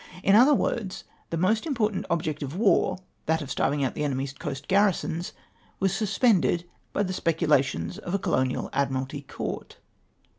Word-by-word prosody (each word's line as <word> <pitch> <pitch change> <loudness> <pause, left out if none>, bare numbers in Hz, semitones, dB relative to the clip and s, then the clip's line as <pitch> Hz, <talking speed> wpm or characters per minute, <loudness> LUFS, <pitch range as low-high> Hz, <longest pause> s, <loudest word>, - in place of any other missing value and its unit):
Li - - +4
other 255 +7 +7
words, 215 -7 -2 0.3
the 165 - -2
most 215 - +1
important 220 -8 0
object 155 -3 -1
of 140 +2 -4
war 195 -2 +3
— - - -43
that 160 0 +1
of 135 - -7
starving 140 +1 +1
out 130 - 0
the - - -3
enemy's 135 -1 -2
coast 135 0 -6
garrisons 185 -3 +1 0.2
— - - -34
was 195 -1 +1
sus 205 -3 -2
pended 190 -7 +3 0.3
by 205 - 0
the 185 -1 -2
speculations 145 - +1
of 175 - -3
a - - +3
colonial 130 -8 0
Admiralty 135 +1 -1
Court 140 - -6
170 Hz, 175 wpm, -26 LUFS, 140-200 Hz, 0.3 s, other